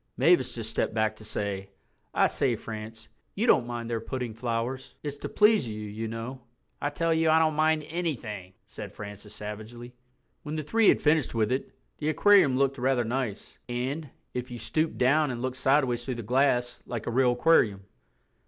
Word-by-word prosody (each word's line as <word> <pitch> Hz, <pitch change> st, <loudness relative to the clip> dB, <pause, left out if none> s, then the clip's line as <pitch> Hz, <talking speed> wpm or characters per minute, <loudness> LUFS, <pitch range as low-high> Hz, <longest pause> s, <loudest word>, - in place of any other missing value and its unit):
Mavis -, -, +4 dB
just -, -, -2 dB
stepped -, -, -1 dB
back 110 Hz, 0 st, +1 dB
to 110 Hz, -, -12 dB
say, 100 Hz, -2 st, -3 dB, 0.4 s
"I -, -, +3 dB
say, 130 Hz, -4 st, +1 dB
France, 110 Hz, 0 st, -8 dB, 0.3 s
you 215 Hz, -, 0 dB
don't 125 Hz, -, +4 dB
mind 120 Hz, -1 st, -4 dB
their 115 Hz, -1 st, -1 dB
putting 125 Hz, 0 st, -4 dB
flowers? 120 Hz, +2 st, -3 dB
It's 145 Hz, -1 st, -5 dB
to -, -, -5 dB
please 210 Hz, -, +4 dB
you, 110 Hz, -1 st, -5 dB
you 105 Hz, +1 st, -5 dB
know." 115 Hz, +4 st, -6 dB, 0.4 s
"I 145 Hz, -, 0 dB
tell 165 Hz, +3 st, 0 dB
you 160 Hz, 0 st, +2 dB
I 160 Hz, -, +6 dB
don't 160 Hz, -1 st, +3 dB
mind 155 Hz, 0 st, +2 dB
anything," 120 Hz, -, -4 dB
said -, -, -8 dB
Francis 105 Hz, +1 st, -9 dB
savagely. 110 Hz, +4 st, -8 dB, 0.5 s
When 150 Hz, +1 st, -5 dB
the 155 Hz, -, -2 dB
three 220 Hz, +8 st, +4 dB
had -, -, +4 dB
finished 150 Hz, -5 st, +2 dB
with 110 Hz, -1 st, +1 dB
it, 130 Hz, -, -1 dB, 0.3 s
the 150 Hz, -, 0 dB
aquarium 190 Hz, -2 st, +5 dB
really 130 Hz, -, 0 dB
looked 135 Hz, 0 st, -1 dB
rather 130 Hz, -1 st, +2 dB
nice, 120 Hz, -3 st, -4 dB
and, 130 Hz, +5 st, -3 dB, 0.2 s
if 125 Hz, +1 st, -4 dB
you 120 Hz, -, -6 dB
stooped 155 Hz, +9 st, -1 dB
down 145 Hz, +4 st, +3 dB
and 125 Hz, -2 st, -4 dB
looked 130 Hz, 0 st, -2 dB
sideways 130 Hz, -3 st, +2 dB
through 130 Hz, 0 st, -3 dB
the 120 Hz, -, -5 dB
glass, 125 Hz, +1 st, +1 dB
like 120 Hz, -3 st, -4 dB
a -, -, -2 dB
real 125 Hz, 0 st, +3 dB
aquarium. 120 Hz, -7 st, +3 dB
125 Hz, 190 wpm, -28 LUFS, 115-150 Hz, 0.5 s, I